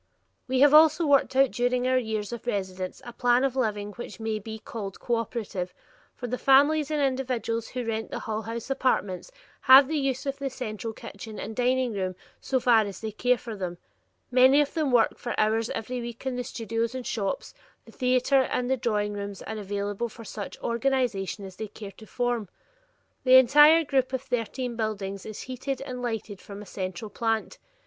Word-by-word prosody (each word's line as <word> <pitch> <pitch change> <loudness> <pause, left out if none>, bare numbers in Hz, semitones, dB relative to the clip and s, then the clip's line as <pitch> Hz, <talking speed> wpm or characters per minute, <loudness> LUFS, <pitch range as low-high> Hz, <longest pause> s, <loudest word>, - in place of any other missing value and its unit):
We 260 0 +1
have 290 0 +7
also 315 +2 +7
worked 280 -2 +3
out 270 -1 +5
during 245 +1 0
our 255 - +3
years 220 -2 -3
of 235 +1 -8
residence 190 -1 -3
a 240 - -8
plan 245 +1 +3
of 270 -2 0
living 210 -5 -1
which 240 +3 -9
may 220 -1 -2
be 220 +1 -7
called 210 -3 -7
cooperative, 230 -6 -3 0.4
for 245 - -6
the 250 +1 -3
families 290 +2 +4
and 305 -1 0
individuals 255 -4 -1
who 250 -1 -4
rent 225 -1 -3
the - - -4
Hull 220 -1 -3
House 230 +4 -5
apartments 255 - 0 0.3
have 265 +1 +8
the 310 0 0
use 270 -1 -1
of 275 0 -3
the 275 -1 -2
central 225 -3 -5
kitchen 215 0 -9
and 220 +1 -6
dining 250 0 +1
room 185 -2 -2 0.2
so 260 - 0
far 240 -2 +5
as 200 -3 -5
they 220 -1 -4
care 250 +4 +2
for 230 -2 -7
them; 180 -3 -4 0.5
many 260 +3 +6
of 290 -1 +1
them 305 -4 0
work 240 -2 +3
for 240 - -3
hours 220 +1 +2
every 245 +3 -4
week 235 +1 -8
in 260 -1 -1
the 250 - -2
studios 230 +1 -3
and 255 -1 -5
shops; 200 -4 -3 0.3
the 225 - -14
theater 255 +2 +3
and 255 0 -1
drawing 210 -3 0
rooms 200 -1 -6
are 220 0 -5
available 205 +3 -3
for 230 +1 -12
such 205 -1 -6
social - - -6
organization 235 -6 0
as 190 -1 -11
they 220 - -4
care 205 0 -9
to 220 +3 -15
form; 245 -5 -1 0.7
the 255 0 +6
entire 295 +6 +7
group 265 -3 0
of 260 0 -2
thirteen 245 -1 -3
buildings 200 -3 -3
is 215 - -7
heated 260 +1 -4
and 255 -2 -6
lighted 220 -5 -4
from 200 0 -9
a 210 - -9
central 190 +2 -5
plant. 225 0 -1
235 Hz, 195 wpm, -27 LUFS, 215-260 Hz, 0.7 s, have